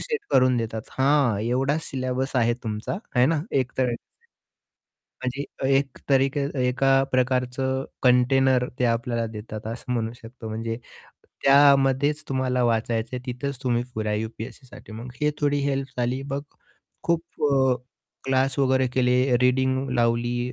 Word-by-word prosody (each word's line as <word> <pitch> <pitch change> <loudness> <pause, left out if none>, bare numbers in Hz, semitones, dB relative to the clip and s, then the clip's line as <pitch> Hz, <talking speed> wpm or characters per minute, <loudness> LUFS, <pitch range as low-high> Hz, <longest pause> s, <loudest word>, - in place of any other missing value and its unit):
Set 455 -3 -2
करून 130 -1 +4
देतात. 110 -1 -3 0.2
हा 135 -6 +3
एवढाच 135 +7 0
सिलॅबस 130 0 -2
आहे 120 -1 +3
तुमचा 110 - -3 0.2
आहे 125 +1 +6
ना, 155 -1 +1
एक 130 -2 0
तर 125 -2 +2 1.3
म्हणजे 130 +2 -3 0.2
अ, - - +2
एक 135 0 +1
तरीके 135 +1 +3 0.3
एका 135 +1 +3
प्रकारचं 130 +1 0 0.2
कंटेनर 125 0 +4
ते 125 - +1
आपल्याला 115 0 0
देतात 110 0 -7
असं 125 +1 -5
म्हणू 115 -1 -1
शकतो 115 -1 -9
म्हणजे 115 +1 -3 0.7
त्यामध्येच 140 +1 +5
तुम्हाला 130 -2 0
वाचायचं 115 0 0
आहे - - -5
तिथेच 130 +2 -4
तुम्ही 120 -2 +1
पुऱ्या 110 -1 -1
यू-पी-एस-सीसाठी, 110 +2 -7
मग 115 +3 -7
ही 150 0 +3
थोडी 145 0 +2
हेल्प 135 -1 -1
झाली. 125 +2 0
मग 140 +1 -2 0.6
खूप 170 -1 +1 0.3
अ, 130 -2 +4 0.5
क्लास 135 +1 +1
वगैरे 130 -1 +3
केले, 125 0 +2
रीडिंग 130 +1 +2
लावली 120 +1 0
130 Hz, 135 wpm, -25 LUFS, 120-135 Hz, 1.3 s, आहे